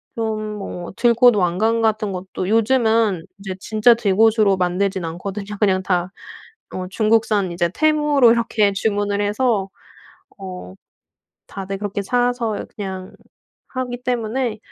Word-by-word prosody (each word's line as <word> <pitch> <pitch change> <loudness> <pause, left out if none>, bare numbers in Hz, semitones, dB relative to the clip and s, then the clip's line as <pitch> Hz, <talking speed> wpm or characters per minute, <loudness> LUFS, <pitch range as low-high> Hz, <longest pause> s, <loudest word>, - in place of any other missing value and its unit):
좀 220 -2 -2 0.2
뭐 175 -3 -6
들꽃 240 -1 +5
왕관 205 +5 +1
같은 215 -2 0
것도 185 0 -5
요즘은 225 -5 +2
이제 195 -1 -6
진짜 220 +4 +4
들꽃으로 215 -1 +3
만들진 185 +1 -1
않거든요. 195 +5 -5
그냥 190 -3 +2
다 180 0 0 0.6
어 185 0 -4
중국산 215 -2 +1
이제 170 0 0
테무로 295 -5 +4
이렇게 220 -3 +1
주문을 205 0 -1
해서 205 -1 0 0.7
어 180 - -8 0.7
다들 195 0 -6
그렇게 205 0 -3
사서 245 0 -1
그냥 190 -2 -6 0.6
하기 250 -2 -4
때문에 240 -1 -1
210 Hz, 255 characters per minute, -20 LUFS, 190-230 Hz, 0.7 s, 들꽃